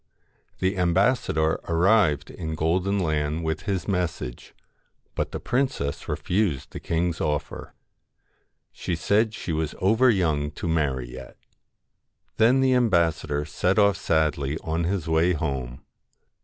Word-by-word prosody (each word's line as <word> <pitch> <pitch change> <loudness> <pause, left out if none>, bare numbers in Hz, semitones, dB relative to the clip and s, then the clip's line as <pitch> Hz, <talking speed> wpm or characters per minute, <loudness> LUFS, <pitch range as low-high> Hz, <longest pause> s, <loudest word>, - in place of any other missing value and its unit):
The 95 +1 -1
ambassador 85 -3 +2
arrived 85 - +3
in 80 -2 -5
Golden 90 +6 0
Land 80 -2 -1
with 80 0 -3
his 95 -2 -1
message, 90 - -3 0.6
but - - -2
the - - -4
princess 125 - -2
refused 90 -9 -1
the - - -7
king's 85 0 -1
offer. 75 -2 -3 1.0
She 90 - -3
said 105 +6 +1
she 90 - -5
was 80 -1 -2
over 110 +7 +4
young 80 -9 +1
to 85 - -5
marry 70 -7 -1
yet 65 -1 -10 1.0
Then 120 +4 +4
the 130 -1 +3
ambassador 85 -10 +1
set 90 +6 0
off 100 -1 +5
sadly 75 -5 0
on 80 +1 -1
his 90 -2 -2
way 80 +2 +3
home. 70 -6 -4
85 Hz, 130 wpm, -25 LUFS, 75-100 Hz, 1.0 s, off